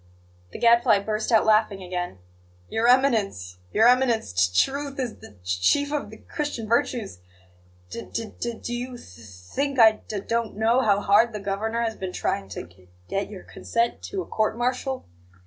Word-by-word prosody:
The - - -7
Gadfly 235 -2 +5
burst 215 +3 -2
out 225 - +5
laughing 215 -3 +2
again. 180 - -4 0.5
"Your 225 +1 +1
Eminence, 215 - +2
Your 220 +2 +5
Eminence, 245 - +3
t 90 0 +2
t 90 - +4
truth 280 0 -5
is 250 -4 -3
the 100 - -15
c 90 0 -2
chief 285 - +3
of 295 - -2
the - - -11
Christian 290 -7 -4
virtues! 230 - 0 0.7
D 230 - -7
d 225 -1 -3 0.4
do 240 - -3
you 245 +1 -4
th 90 - -14
th 115 -2 -14 0.3
think 280 -1 -1
I 225 -2 +8
d 215 - -13
d 210 - -3
don't 230 -1 -2
know 230 +4 +3
how 205 -4 +2
hard 215 +4 +4
the 210 - -4
Governor 215 +4 -2
has 225 -1 -2
been 185 -1 -5
trying 100 -1 -2
to 95 - -6
g 90 +1 -19 0.2
get 195 +1 -2
your 200 -3 -9
consent 235 0 -2
to 390 -2 -3
a - - -13
court 215 +1 -1
martial? 255 +2 -2
220 Hz, 190 wpm, -25 LUFS, 195-245 Hz, 0.7 s, I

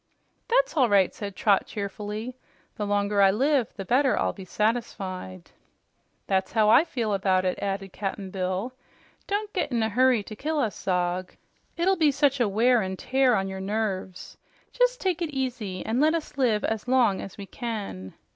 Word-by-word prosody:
"That's - - +2
all 260 -6 +4
right," 195 -3 +4
said 200 -2 -6
Trot 205 -4 +2
cheerfully. 210 +3 -5 0.4
"The 210 - -3
longer 205 0 +2
you 195 +1 +4 0.3
take, - - -22
the 195 - -6
better 260 +5 +3
I'll - - 0
be 190 - -10
satisfied." 190 - -3 0.7
"That's 190 -1 0
how 215 -2 +4
I 285 - +7
feel 230 -9 -2
about 190 -1 +1
it," 185 - -1
added 195 -1 -3
Cap'n 195 -1 -4
Bill. 185 +6 -2 0.5
"Don't 415 +1 -2
get 360 - -1
in 235 -2 +1
a 220 - +1
hurry 250 0 +3
to 215 - -9
kill 310 +7 -2
us 230 -8 0
Zog. 180 0 -2 0.4
It'll 375 +3 +2
be 315 -3 +4
such 280 -1 +2
a 235 -4 +2
wear 235 +4 +3
an' 190 -1 -4
tear 260 +1 +2
on 195 -1 0
your 190 0 -5
nerves. 195 -2 -3 0.4
Jes' - - +2
take 370 -5 -1
it 335 - -1
easy 245 -9 -4
an' 230 +3 0
let 310 +3 +4
us 315 -2 -5
live 240 -6 +1
as 220 +1 -2
long 245 -6 +3
as 195 - -9
we 200 - -7
can." 200 - -6
215 Hz, 185 wpm, -26 LUFS, 195-260 Hz, 0.7 s, I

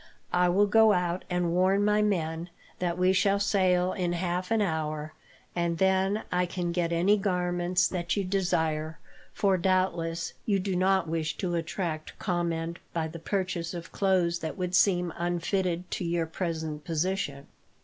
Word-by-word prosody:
"I 180 0 +4
will 195 +4 +4
go 220 +1 +5
out, 180 0 -1
and 180 -1 0
warn 190 +3 +3
my 210 0 +3
men 170 -4 -1 0.3
that 175 -1 -1
we 185 +1 +3
shall 195 +2 +3
sail 185 -3 +2
in 175 -3 -1
half 180 +1 -2
an 225 -1 +2
hour, 155 -5 -2 0.4
and 170 -1 0
then 190 +3 +2
I 180 0 +1
can 175 -1 -2
get 170 -1 0
any 180 +5 +3
garments 180 -2 +1
that 175 +1 -2
you 200 - +1
desire; 160 -4 0 0.3
for, 195 -2 +2
doubtless, 170 -3 0
you 200 -2 +1
do 190 0 -2
not 190 -1 +2
wish 160 -1 -2
to 180 -3 -2
attract 165 -1 -3
comment 170 -2 -2
by 160 -1 -1
the 165 +1 -8
purchase 180 -2 -2
of 165 -1 -7
clothes 180 -3 +1
that 160 +2 -5
would 180 -1 -3
seem 180 -2 +3
unfitted 175 +1 -1
to - - -2
your 170 -1 0
present 160 -3 -4
position." 165 -4 -2
180 Hz, 160 wpm, -28 LUFS, 170-190 Hz, 0.4 s, go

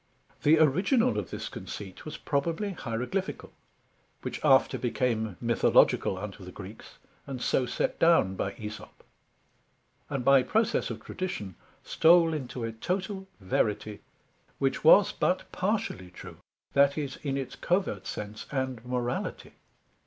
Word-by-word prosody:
The 155 +2 +5
original 190 - +3
of - - -6
this - - -5
conceit 95 -3 -8
was 155 - -6
probably 165 +8 -1
Hieroglyphical, 130 +5 -4 0.7
which - - -5
after - - +4
became 115 -5 -1
Mythological 115 -4 +3
unto 100 0 -7
the 90 - -9
Greeks, 100 +3 -11 0.3
and 135 -2 -5
so 125 +1 +1
set - - -1
down 165 - +4
by 100 +1 -3
Æsop; 105 +1 -8 1.2
and 135 -4 -3
by 135 -1 +7
process 220 - +1
of - - -6
tradition, 180 - -4 0.3
stole 165 0 +5
into 130 -4 -4
a 115 - -2
total 190 - -3
verity, 105 +2 -1 0.6
which - - 0
was - - +7
but - - 0
partially 95 -1 -2
true, 90 - -11 0.4
that 140 +1 +4
is 140 -3 -3
in 135 -2 -3
its 135 -2 -5
covert 175 - -1
sense 105 0 -6
and 130 -4 -2
Morality. 125 -1 -3
130 Hz, 130 wpm, -28 LUFS, 110-165 Hz, 1.2 s, by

